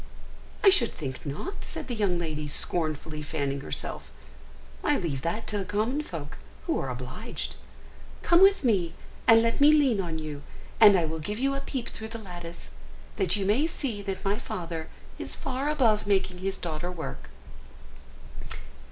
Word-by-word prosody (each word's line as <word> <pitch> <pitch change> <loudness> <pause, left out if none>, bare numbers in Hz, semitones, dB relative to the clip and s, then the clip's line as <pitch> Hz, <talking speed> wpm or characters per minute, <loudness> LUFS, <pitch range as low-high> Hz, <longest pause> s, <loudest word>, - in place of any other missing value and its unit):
"I 395 - +9
should 235 - +4
think 135 -2 -6
not," 240 - -5
said - - -6
the 250 - -3
young 200 -6 +1
lady, 155 -3 -3
scornfully 155 0 0
fanning 140 -2 -2
herself; - - -4 0.7
"I 295 -2 +3
leave 150 -8 -2
that 190 +9 -2
to 210 - -2
the - - -1
common 215 +9 0
folk, 160 - -7 0.3
who - - +1
are 135 - -2
obliged. 125 - -5 0.7
Come 345 +1 +5
with 395 -2 +6
me 195 -9 +2 0.3
and 225 0 +8
let 230 +4 +1
me 290 +1 +9
lean 275 -9 +4
on 165 -3 -3
you, 155 -2 -5 0.4
and 205 -3 +9
I 170 - +2
will 160 +1 -3
give 210 +7 -4
you 275 +3 +1
a 275 - -1
peep 260 -4 -4
through 220 - -7
the 225 +1 -6
lattice, 175 - -8 0.5
that 185 0 +3
you 200 -2 -1
may 235 +11 +3
see 255 -10 -3
that 195 -1 -4
my 200 +2 +1
father 165 -2 -5 0.3
is - - -4
far 270 +2 -2
above 225 -9 +3
making 190 -2 +1
his 190 +1 -1
daughter 170 +1 -3
work. 170 -3 -6
190 Hz, 170 wpm, -28 LUFS, 160-230 Hz, 0.7 s, I